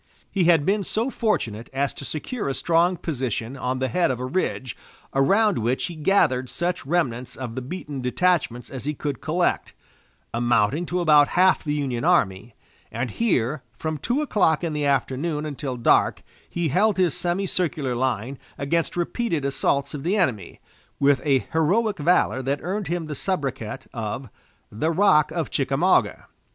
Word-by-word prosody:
He 190 -4 +1
had 165 -4 +4
been 200 +2 +1
so 230 +7 -1
fortunate 115 - -1
as 140 +1 0
to 140 - -8
secure 160 - -3
a 135 - -2
strong 175 +2 +2
position 130 -6 -3
on 130 -1 -2
the 130 0 0
head 175 +2 +1
of 125 -2 -2
a 125 - -3
ridge, 130 -3 -2 0.4
around 195 - +3
which 120 +4 0
he 175 - -6
gathered 150 -7 +2
such 175 +3 -2
remnants 130 -7 -1
of 125 -3 -6
the 130 - -4
beaten 145 0 -6
detachments 125 -2 0
as 130 -2 -7
he 150 +1 -2
could 140 -2 -4
collect, 175 +3 0 0.6
amounting 120 +6 +1
to 180 0 -1
about 150 -3 +6
half 185 +1 +4
the 150 -1 -1
Union 135 -4 -2
army, 110 - +1 0.4
and 120 +1 -3
here, 145 - 0 0.2
from 155 -1 -3
two 255 - 0
o'clock 180 - +2
in 165 -2 -1
the 150 -1 -1
afternoon 140 +3 0
until 140 -3 -4
dark, 120 - +3 0.3
he 170 -2 -1
held 200 +7 +2
his 180 -2 +2
semicircular 175 -6 -1
line 125 +1 -2 0.2
against 165 +5 -1
repeated 175 - -1
assaults 140 0 0
of 145 - -5
the 185 +8 0
enemy, 115 - -1 0.4
with 140 0 +3
a 135 -4 +2
heroic 200 +6 +2
valor 145 -4 +2
that 135 +2 -1
earned 195 +3 -2
him 170 0 -2
the 155 - -5
sobriquet 135 - -3
of 115 +2 -4 0.4
"The 115 +10 -1
Rock 165 -4 +4
of - - -3
Chickamauga." - - +1
150 Hz, 165 wpm, -24 LUFS, 130-175 Hz, 0.6 s, about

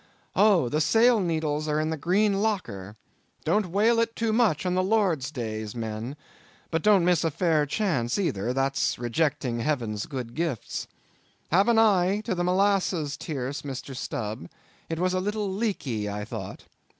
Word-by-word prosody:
Oh! 200 - +4
the 150 +5 0
sail 230 +8 +4
needles 155 -4 -1
are 150 0 +1
in 155 +1 -1
the - - 0
green 195 +6 +1
locker! 110 - -2 0.5
Don't 210 -2 +2
whale 215 +6 +3
it 230 0 0
too 225 -1 0
much 215 -9 +2
a' - - +1
Lord's 185 - +1
days, 110 -5 -5
men; 115 +3 -4 0.6
but 165 -1 0
don't 200 -3 +4
miss 175 -2 +3
a 165 - +2
fair 155 -2 +1
chance 140 - 0
either, 120 - -1
that's 135 +1 0
rejecting 125 0 -1
Heaven's 115 -6 -2
good 125 -5 -5
gifts. 160 -6 -3 0.6
Have 195 +6 +4
an 235 -1 +4
eye 200 -2 +4
to 225 - 0
the 175 -1 -1
molasses 180 -5 +1
tierce, 140 -3 -4
Mr. 135 -1 -6
Stubb; 105 -7 -4 0.4
it 165 - -2
was 180 +2 +1
a 185 - +1
little 205 0 -2
leaky, 140 - -2
I 105 0 -4
thought. - - -7
160 Hz, 160 wpm, -26 LUFS, 125-200 Hz, 0.6 s, Oh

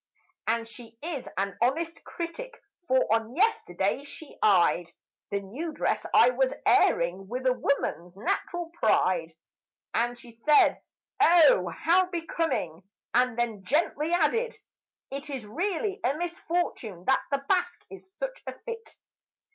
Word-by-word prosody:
And 230 +1 0
she 230 0 -12
is 315 -6 -4
a 195 0 -1
careful 325 +7 0
critic; 465 +9 -6 0.3
for 260 -1 +3
on 225 +2 -1
yesterday 275 - +1
she 290 +1 -11
eyed 175 -3 +3 0.4
The 200 0 -1
new 265 - -5
dress - - -1
I - - +6
was - - +1
airing 180 +3 +3
with 250 +4 -4
a 255 - +4
woman's 185 -9 -2
natural 340 - -2
pride, 180 - +2 0.6
And 240 +1 0
she 235 -2 -15
said, 300 -1 +5 0.4
"Oh, 315 - +6
how 345 - +2
becoming!" 325 - -2 0.3
and 250 -1 +2
then 225 -5 -1
softly 300 - 0
added, 405 +9 +1 0.5
"It 280 +2 -6
Is 265 -6 -5
really 375 - -2
a 270 +4 +1
misfortune 340 - -3
that 265 - +3
the 275 0 -1
basque 360 -2 0
is 380 -1 -12
such - - -4
a - - -6
fit." 460 -1 -8
275 Hz, 135 wpm, -28 LUFS, 220-345 Hz, 0.6 s, I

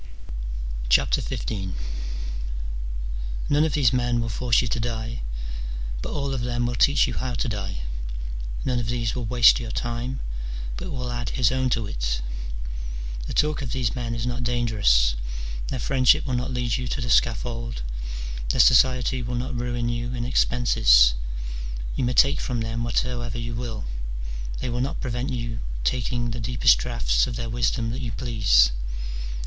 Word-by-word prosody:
XV. - - +3 2.2
None 145 +1 +4
of 160 -3 +1
these 130 -6 +4
men 120 -1 +2
will 115 -1 -1
force 120 +1 +2
you - - -1
to 120 - -1
die, 115 0 -3 0.8
but - - -4
all 140 -1 -1
of 130 - -2
them 120 0 0
will 120 - -1
teach 140 +4 +5
you - - -3
how 125 -1 -2
to 130 - -1
die: 95 - -3 0.8
none 125 -2 +1
of 120 - -2
these 115 -1 0
will 125 -2 -3
waste 120 +1 +6
your 120 -2 -4
time, 120 +3 -2 0.6
but - - -5
will 125 -3 -3
add 120 -2 -2
his 125 +1 +2
own 130 0 +1
to 115 -3 +1
it. - - -2 1.1
The - - -4
talk 150 -1 +2
of 130 - -3
these 125 -4 0
men 120 -2 -2
is 115 0 -2
not 125 +1 -2
dangerous, 110 - +3 0.5
their 130 - -2
friendship 130 +1 +4
will 130 - -2
not 125 +1 0
lead 125 -2 0
you 125 -1 -3
to 120 - -2
the 120 - -2
scaffold, 115 - +1 0.7
their - - 0
society 125 +1 +5
will 120 +1 -3
not 125 +1 -2
ruin 120 0 -1
you 120 +1 -2
in 120 -1 -2
expenses: - - +5 0.8
you - - 0
may 125 0 +1
take 140 +3 +5
from 120 -3 -1
them 115 +1 -2
whatsoever 120 0 -1
you 120 0 -3
will; 115 -3 -4 0.8
they - - -2
will 120 +1 -1
not 135 - -2
prevent 125 0 -2
your 115 -2 -3 0.2
taking 120 - 0
the 120 - -4
deepest 115 - +4
draughts - - +1
of 120 - -4
their 115 -1 -3
wisdom 115 0 0
that 130 +3 -4
you 120 -3 -3
please. 105 - +4
120 Hz, 165 wpm, -25 LUFS, 115-125 Hz, 2.2 s, waste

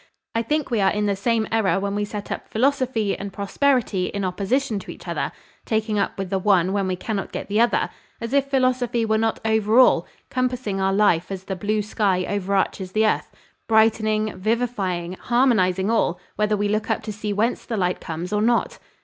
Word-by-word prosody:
I 230 - +1
think 300 +4 -1
we 225 -3 +2
are 195 - +4
in 210 +1 0
the 200 -1 +1
same 220 +2 0
error 220 -4 +2
when 200 0 -2
we 205 0 -1
set 205 0 -7
up - - -4
philosophy 250 -4 +1
and 200 0 -6
prosperity 200 -1 +1
in 200 -1 -3
opposition 210 +5 0
to - - -12
each - - -10
other, - - -2 0.3
taking 220 -1 0
up - - -1
with 195 -2 -4
the 195 - +1
one 190 -2 +3
when 200 -2 0
we 185 - 0
cannot 195 +1 -4
get - - -5
the 210 +3 +2
other, 235 - +2 0.3
as 230 +2 -5
if 275 -1 +2
philosophy 255 -3 +1
were 220 0 +1
not 225 0 0
over 220 0 +2
all, 255 - +5 0.2
compassing 250 -6 -1
our 190 0 +2
life 195 -3 +2
as 190 -1 -5
the 190 0 -4
blue 210 +3 -1
sky 195 -3 0
overarches 195 -1 -1
the 220 +1 +3
earth, 215 - 0 0.4
brightening, 215 -1 +2
vivifying, 195 -4 -1
harmonising 220 -6 +2
all, 180 -6 +1 0.2
whether 210 0 +1
we 205 0 0
look 215 +1 -1
up 225 - 0
to 215 -1 -5
see 210 0 -4
whence 220 +4 0
the 225 - -4
light 180 -2 0
comes 170 +4 -5
or 210 - +1
not." 235 +2 +1
210 Hz, 200 wpm, -23 LUFS, 195-230 Hz, 0.4 s, all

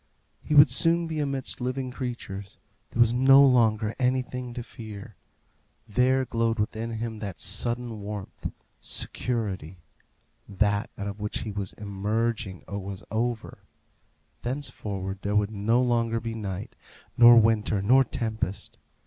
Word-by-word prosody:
He 150 - -2
would 145 +1 +8
soon 170 0 +4
be 160 -1 -3
amidst 135 -3 -2
living 130 +1 -2
creatures. 115 -6 -6 0.3
There - - -7
was 120 0 +5
no 135 +3 +7
longer 110 -4 +3
anything 125 -1 -1
to 120 - -4
fear. 110 -2 -10 0.7
There 130 +4 +2
glowed 115 -1 0
within 110 +2 -2
him 110 -1 -4
that 100 -7 -6
sudden 120 +4 -1
warmth 100 -1 -6 0.3
security; 100 -8 -3 0.7
that 100 0 +1
out 100 - -4
of 100 +1 -5
which 105 0 -3
he 110 - -4
was 100 -2 -4
emerging 105 0 -2
was 100 -1 -6
over; 115 +1 -2 0.8
thenceforward 105 -8 -4
there 100 +1 -2
would 105 0 +2
no 110 +3 +1
longer 115 -2 +1
be 115 0 -5
night, 100 -3 -5 0.4
nor 120 0 +9
winter, 110 -2 +2
nor 125 +7 +5
tempest. 110 -6 -4
115 Hz, 130 wpm, -27 LUFS, 100-125 Hz, 0.8 s, nor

